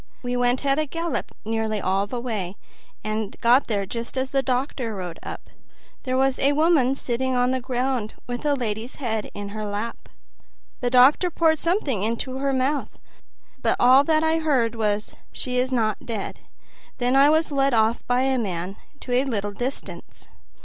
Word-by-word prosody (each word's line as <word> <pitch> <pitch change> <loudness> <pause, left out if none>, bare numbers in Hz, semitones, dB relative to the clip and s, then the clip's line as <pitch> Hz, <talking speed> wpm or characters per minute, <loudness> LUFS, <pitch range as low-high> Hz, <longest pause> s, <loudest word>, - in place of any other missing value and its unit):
"We 245 0 -2
went 245 +2 +1
a 285 +3 +2
gallop 330 +3 -3
nearly 220 -1 -1
all 195 +1 0
the 245 +4 -4
way, 210 -7 -3 0.5
and 215 -1 -3
got 245 +4 +4
there 200 -3 -1
just 230 +5 -5
as 260 0 -1
the 275 - +2
doctor 255 -3 -2
rode 180 -3 -6
up. - - -8 0.5
There 255 0 0
was 265 0 +2
a 280 +2 +3
woman 295 -4 +3
sitting 260 0 -1
on 250 0 +2
the 260 0 -1
ground 250 -3 -2
with 245 -1 -4
the 295 -1 +1
lady's 230 -1 -4
head 220 -5 -3
in 205 0 -5
her 215 +1 -5
lap. 210 +3 -5 0.7
The 245 - 0
doctor 260 +8 +5
poured 320 -2 +2
something 335 - 0
into 235 +4 -2
her 275 0 +1
mouth, 270 +2 -1 0.6
but - - +2
all 255 +3 +7
that 315 0 +3
I 320 0 +2
heard 260 -8 +1
was, 210 -2 -1 0.2
'She 250 -1 -2
is 255 +1 0
not 220 -4 0
dead.' 220 -4 -5 0.6
Then 250 +1 +1
I 275 +2 +7
was 315 0 +3
led 275 -2 +2
off 225 +1 +2
by 245 +1 +2
a 265 -1 +1
man 185 -2 -3 0.2
to 250 - -7
a 250 +2 +3
little 205 -6 -2
distance. 245 +7 -6
250 Hz, 175 wpm, -24 LUFS, 220-270 Hz, 0.7 s, all